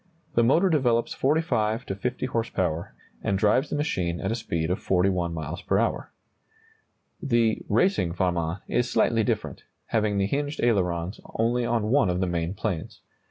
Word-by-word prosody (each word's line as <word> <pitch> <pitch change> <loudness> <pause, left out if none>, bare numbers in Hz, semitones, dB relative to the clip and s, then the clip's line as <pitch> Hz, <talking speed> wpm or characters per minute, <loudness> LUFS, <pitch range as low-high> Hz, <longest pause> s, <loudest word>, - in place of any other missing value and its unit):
The 120 - +4
motor 160 +11 +4
develops 125 -8 +2
45 125 -6 +1
to - - -3
50 125 +6 -3
horse 115 -3 -1
power, 85 -3 -2 0.3
and 100 - +1
drives 110 +8 +2
the - - -2
machine 90 - -1
at 95 - -2
a - - 0
speed 85 -8 -2
of 90 - -1
41 90 -2 +1
miles 80 +2 -5
per - - +1
hour. - - 0 1.1
The 120 -5 +2
"racing 110 - +2
Farman" 90 0 -1
is 120 0 0
slightly 115 -1 +2
different, - - -3 0.2
having 105 -2 +1
the 100 - +2
hinged 145 +6 -2
ailerons 90 -5 0 0.2
only 120 +2 +1
on 115 -2 0
one 135 -7 +4
of 90 0 0
the 95 - +1
main 85 +1 -2
planes. 95 -5 -4
105 Hz, 165 wpm, -26 LUFS, 90-120 Hz, 1.1 s, The